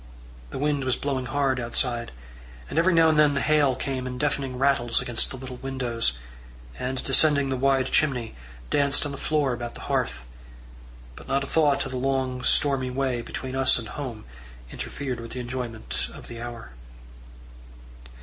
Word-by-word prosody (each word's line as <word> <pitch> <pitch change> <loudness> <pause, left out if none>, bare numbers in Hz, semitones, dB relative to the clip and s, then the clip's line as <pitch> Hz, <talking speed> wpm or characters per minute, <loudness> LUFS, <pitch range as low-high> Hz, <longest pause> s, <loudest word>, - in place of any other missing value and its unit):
The - - -6
wind 145 0 0
was 130 -1 +2
blowing 135 -3 -2
hard 135 -1 +1
outside, 120 0 0 0.6
and 155 - +2
every 180 +3 +4
now 165 -2 +6
and 155 -1 +3
then 150 -2 +5
the - - +2
hail 150 -4 +3
came 130 -1 -3
in 125 0 -5
deafening 135 -2 -1
rattles 130 -3 +2
against 120 -2 0
the 130 - -7
little 130 -1 -8
windows, 125 - -1 0.7
and, 130 0 -2
descending 140 0 +4
the 135 - 0
wide 135 0 +2
chimney, 125 -7 +1 0.4
danced 140 +1 +3
on 145 - -3
the 140 - -6
floor 150 -4 +1
about 120 -1 -5
the - - -9
hearth; - - -1 0.9
but - - -12
not 135 +1 +1
a - - -5
thought 145 -3 +3
of 135 - -6
the 130 - -3
long, 130 -1 0
stormy 135 -3 +2
way 130 -2 -1
between 130 +2 -5
us 135 -1 +4
and 115 -3 -5
home 120 -6 -6 0.5
interfered 125 - -4
with 115 0 -8
the 125 - -4
enjoyment 120 -2 -4
of - - -11
the 115 0 -8
hour. 120 - -7
130 Hz, 175 wpm, -26 LUFS, 125-140 Hz, 0.9 s, now